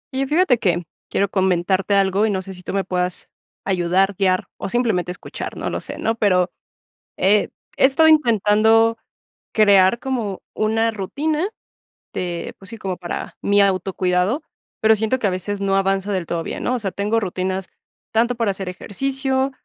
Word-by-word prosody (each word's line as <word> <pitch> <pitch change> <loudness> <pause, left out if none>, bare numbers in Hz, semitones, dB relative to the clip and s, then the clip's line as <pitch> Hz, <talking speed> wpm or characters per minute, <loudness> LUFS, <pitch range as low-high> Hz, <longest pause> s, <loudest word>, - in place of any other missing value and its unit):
Y 270 0 0
fíjate 295 -5 +3
que, 175 -3 0 0.2
quiero 200 - +1
comentarte 190 +1 +1
algo 195 +2 +3
y - - 0
no 190 -2 -1
sé 190 0 -8
si 180 - -11
tú - - -6
me 195 0 0
puedas 180 -1 -3 0.3
ayudar, 190 +1 +2
guiar, 185 -1 +1
o - - -4
simplemente 200 -7 0
escuchar, 180 - -7
no - - -3
lo - - -2
sé, - - -6
¿no?, 225 - 0
pero, 185 -5 +2 0.7
he 200 +2 +3 0.3
he - - +2
estado 280 +4 +5
intentando 225 -5 +4 0.6
crear 200 0 +5
como 235 -7 -3
una 225 +1 +1
rutina 300 - -2 0.7
de, 175 -2 -4
pues 195 - -13
sí, 230 - -8
como 190 -3 -3
para 175 -1 -6
mi 205 0 +3
autocuidado, 185 - +1 0.4
pero 220 0 +5
siento 220 +4 0
que 225 - 0
a - - +2
veces 190 +2 -3
no 195 -1 +1
avanza 195 +1 0
del 190 -3 -1
todo 170 0 -3
bien, - - -5
¿no?, 250 - +1
o - - -2
sea, 205 -4 -2
tengo 210 +4 0
rutinas 190 -1 -3 0.4
tanto 235 +2 +2
para 230 -4 0
hacer 190 -1 -5
ejercicio, 265 +7 -1
200 Hz, 175 wpm, -21 LUFS, 185-225 Hz, 0.7 s, estado